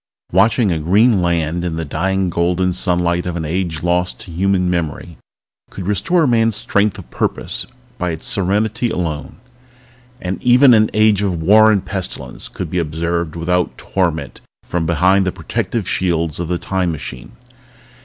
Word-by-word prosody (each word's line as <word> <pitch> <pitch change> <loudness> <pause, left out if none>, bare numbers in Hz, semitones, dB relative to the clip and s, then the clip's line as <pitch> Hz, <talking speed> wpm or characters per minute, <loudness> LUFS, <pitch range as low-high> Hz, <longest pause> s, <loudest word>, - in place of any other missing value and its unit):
Watching 115 -3 +3
a 80 - 0
green 100 +6 +3
land 85 -1 0
in 85 -2 -2
the 80 0 -3
dying 95 +5 -1
golden 90 +2 +1
sunlight 90 -1 +1
of 90 - -3
an 80 -2 -3
age 85 -1 -2
lost 90 +1 0
to 90 - -9
human 90 +1 +1
memory 85 -1 -3 0.5
could 95 - -7
restore 105 - +1
a - - +3
man's 115 -3 +2
strength 100 -1 0
of - - -12
purpose - - -3 0.3
by 90 - -1
its 80 -1 -5
serenity 110 +1 0
alone. 80 -7 -3 0.8
But 90 +1 -4
even 125 +1 +6
an 110 -1 +4
age 110 -2 +4
of 90 -5 -1
war 110 +5 +6
and 100 -3 0
pestilence 95 -3 -5
could - - -6
be 90 - 0
observed 85 +1 -2
without 90 +1 -1
torment 85 -4 -2 0.2
from 85 -2 -2
behind 90 +4 +3
the - - +1
protective - - -3
shields 85 -4 0
of 85 - -3
the 90 +1 -1
Time 95 -1 -1
Machine. 65 -5 -7
90 Hz, 165 wpm, -18 LUFS, 85-100 Hz, 0.8 s, even